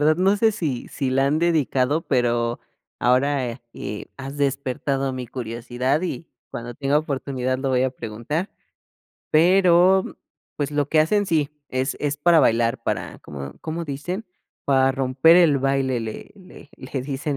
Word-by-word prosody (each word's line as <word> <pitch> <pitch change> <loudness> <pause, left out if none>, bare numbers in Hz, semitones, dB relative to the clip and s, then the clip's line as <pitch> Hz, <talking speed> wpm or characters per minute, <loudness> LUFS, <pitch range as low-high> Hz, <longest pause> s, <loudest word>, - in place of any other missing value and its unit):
verdad, 155 +1 +4
no 190 +3 +3
sé, 220 +1 +3
si 150 -11 -3
si 135 -3 -2
la 135 +1 +2
han 150 +3 +2
dedicado, 155 -3 +1
pero, 120 -3 0 0.4
ahora 130 -1 +1
eh, 105 - -6
has 135 +1 -7
despertado 135 -1 -1
mi 130 -1 -5
curiosidad 120 +4 -2
y 170 -2 -4 0.2
cuando 120 +1 -6
tenga 140 +3 +1
oportunidad 130 -3 -2
lo 135 0 -1
voy 125 -1 +2
a 130 - 0
preguntar, 125 - -4 0.8
pero, 180 +2 +5 0.5
pues, 145 -1 -2
lo 145 -1 0
que 155 - +2
hacen 205 +6 +2
sí, 155 -4 +1 0.2
es 130 +2 -2
es 145 -1 -1
para 165 +2 +5
bailar, 115 -2 +2
para, - - -3
¿cómo 70 -1 -8
cómo 165 +1 -4
dicen? 165 +8 -4 0.4
Para 135 -1 +3
romper 135 +5 +4
el 165 -6 +5
baile 135 -2 0
le 110 -1 -7
le 185 -6 -15
le 130 0 -5
dicen 140 +1 -3
140 Hz, 155 wpm, -23 LUFS, 130-155 Hz, 0.8 s, pero